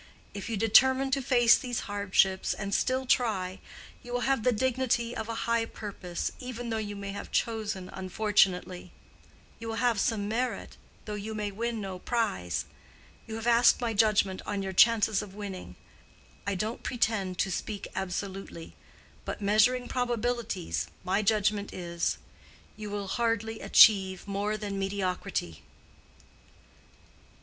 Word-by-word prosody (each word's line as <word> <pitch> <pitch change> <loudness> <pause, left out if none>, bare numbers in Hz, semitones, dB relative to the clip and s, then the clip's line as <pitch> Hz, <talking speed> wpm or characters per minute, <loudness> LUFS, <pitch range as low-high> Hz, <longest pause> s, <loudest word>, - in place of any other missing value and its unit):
If 200 +2 -6
you 225 - -1
determine 260 +5 +5
to 275 0 +1
face 240 -2 +5
these 245 -3 -3
hardships 195 -2 +1
and 200 -1 -4
still 260 +4 +1
try, 195 -8 +1 0.4
you 245 - -10
will 245 - 0
have 270 -2 +1
the 250 - +3
dignity 245 0 0
of 220 -1 -4
a 225 0 -3
high 235 0 +2
purpose, 195 -6 -5
even 245 -2 -5
though 225 - 0
you 205 -1 -4
may 200 0 -5
have 200 - -7
chosen 215 -5 -1
unfortunately. 185 -2 +1 0.7
You 230 - -7
will 225 - -3
have 235 -2 +1
some 210 -2 0
merit, 245 +4 -2 0.3
though 210 - -5
you 210 +1 -5
may 210 -1 -2
win 230 +3 -3
no 190 -2 -5
prize. 200 - -1 0.6
You 220 - -5
have 225 0 -5
asked 240 0 +5
my 235 -3 -1
judgment 200 -3 +2
on 200 -1 -2
your 190 0 -4
chances 220 0 +5
of 195 -2 -10
winning. 200 -3 -7 0.7
I 200 - 0
don't 215 +5 -3
pretend 210 -7 -1
to 190 - 0
speak 205 +2 -4
absolutely; 190 -2 -5 0.5
but - - -5
measuring 220 +5 +3
probabilities, 235 - -2 0.2
my 190 +3 +1
judgment 210 -1 +1
is:—you 175 +4 -6
will 205 -1 -4
hardly 225 0 -1
achieve 190 -3 +5
more 205 +2 -1
than 200 -2 -4
mediocrity." 190 - -2
210 Hz, 140 wpm, -29 LUFS, 195-230 Hz, 0.7 s, determine